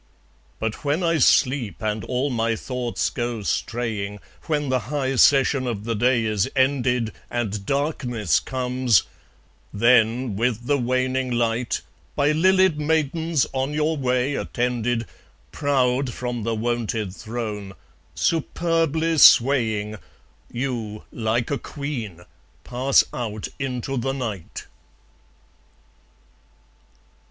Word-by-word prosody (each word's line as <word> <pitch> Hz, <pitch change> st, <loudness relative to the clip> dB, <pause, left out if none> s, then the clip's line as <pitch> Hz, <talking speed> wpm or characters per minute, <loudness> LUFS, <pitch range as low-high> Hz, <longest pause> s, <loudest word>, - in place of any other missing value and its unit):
But 110 Hz, +4 st, -4 dB
when 150 Hz, +5 st, 0 dB
I 165 Hz, -2 st, +2 dB
sleep, 125 Hz, -4 st, +2 dB
and 105 Hz, 0 st, -1 dB
all 130 Hz, +3 st, -1 dB
my 115 Hz, -1 st, 0 dB
thoughts 125 Hz, 0 st, -2 dB
go 120 Hz, -3 st, -3 dB
straying, 105 Hz, -2 st, -2 dB, 0.3 s
When 150 Hz, -3 st, 0 dB
the 130 Hz, 0 st, +2 dB
high 135 Hz, -2 st, -1 dB
session 135 Hz, 0 st, +4 dB
of 110 Hz, -4 st, -3 dB
the 115 Hz, +1 st, -2 dB
day 120 Hz, +1 st, +2 dB
is 105 Hz, -3 st, 0 dB
ended, 125 Hz, -4 st, +1 dB, 0.2 s
And 105 Hz, -4 st, -3 dB
darkness 125 Hz, -, 0 dB
comes; 125 Hz, -5 st, +1 dB, 0.7 s
then, 115 Hz, +1 st, +3 dB
with 120 Hz, +2 st, -1 dB
the 145 Hz, +1 st, +2 dB
waning 130 Hz, +1 st, 0 dB
light, 120 Hz, 0 st, 0 dB, 0.3 s
By 145 Hz, +1 st, +3 dB
lilied 185 Hz, 0 st, +3 dB
maidens 160 Hz, 0 st, +1 dB
on 135 Hz, +2 st, -1 dB
your 155 Hz, +1 st, +1 dB
way 130 Hz, 0 st, 0 dB
attended, 120 Hz, -3 st, -1 dB, 0.5 s
Proud 130 Hz, -2 st, +1 dB
from 120 Hz, -1 st, -4 dB
the 115 Hz, +1 st, -1 dB
wonted 110 Hz, -3 st, -2 dB
throne, 110 Hz, -4 st, -5 dB, 0.4 s
superbly 165 Hz, -1 st, 0 dB
swaying, 110 Hz, -6 st, +5 dB, 0.5 s
You, 120 Hz, -4 st, -4 dB
like 115 Hz, +2 st, -1 dB
a 140 Hz, -, 0 dB
queen, 120 Hz, -, -6 dB, 0.4 s
pass 130 Hz, +2 st, +3 dB
out 110 Hz, -3 st, -4 dB
into 135 Hz, 0 st, -3 dB
the 135 Hz, +3 st, -1 dB
night. 110 Hz, -10 st, -5 dB
125 Hz, 110 wpm, -23 LUFS, 115-140 Hz, 0.7 s, swaying